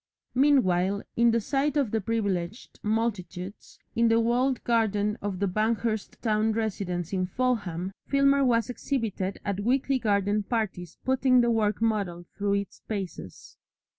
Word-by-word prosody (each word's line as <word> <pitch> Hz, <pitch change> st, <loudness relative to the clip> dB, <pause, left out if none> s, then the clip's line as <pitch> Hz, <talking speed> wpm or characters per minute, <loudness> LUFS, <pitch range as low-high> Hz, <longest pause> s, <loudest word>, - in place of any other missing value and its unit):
Meanwhile, 200 Hz, -9 st, +3 dB
in 235 Hz, 0 st, +4 dB
the 230 Hz, 0 st, +3 dB
sight 280 Hz, +5 st, 0 dB
of 270 Hz, -7 st, +1 dB
privileged 210 Hz, -2 st, -2 dB
multitudes 205 Hz, -4 st, -3 dB, 0.2 s
in 235 Hz, 0 st, +4 dB
the 225 Hz, 0 st, +4 dB
walled 245 Hz, +3 st, +1 dB
garden 210 Hz, -3 st, +1 dB
of 200 Hz, -2 st, -3 dB
the 200 Hz, +2 st, 0 dB
Banghurst 220 Hz, +2 st, -1 dB
town 220 Hz, -1 st, +2 dB
residence 190 Hz, -5 st, -2 dB
in 185 Hz, -1 st, 0 dB
Fulham, 195 Hz, -6 st, -1 dB, 0.2 s
Filmer 275 Hz, 0 st, +4 dB
was 235 Hz, -3 st, +2 dB
exhibited 225 Hz, -7 st, -2 dB
at 200 Hz, -2 st, -1 dB
weekly 260 Hz, +4 st, +1 dB
garden 205 Hz, -2 st, +1 dB
parties 195 Hz, -6 st, -3 dB
putting 260 Hz, -1 st, +4 dB
the 235 Hz, 0 st, +2 dB
working 220 Hz, 0 st, +2 dB
model 185 Hz, -6 st, -2 dB
through 200 Hz, 0 st, 0 dB
its 200 Hz, 0 st, -3 dB
paces. 190 Hz, -, -6 dB
215 Hz, 135 wpm, -27 LUFS, 195-235 Hz, 0.2 s, in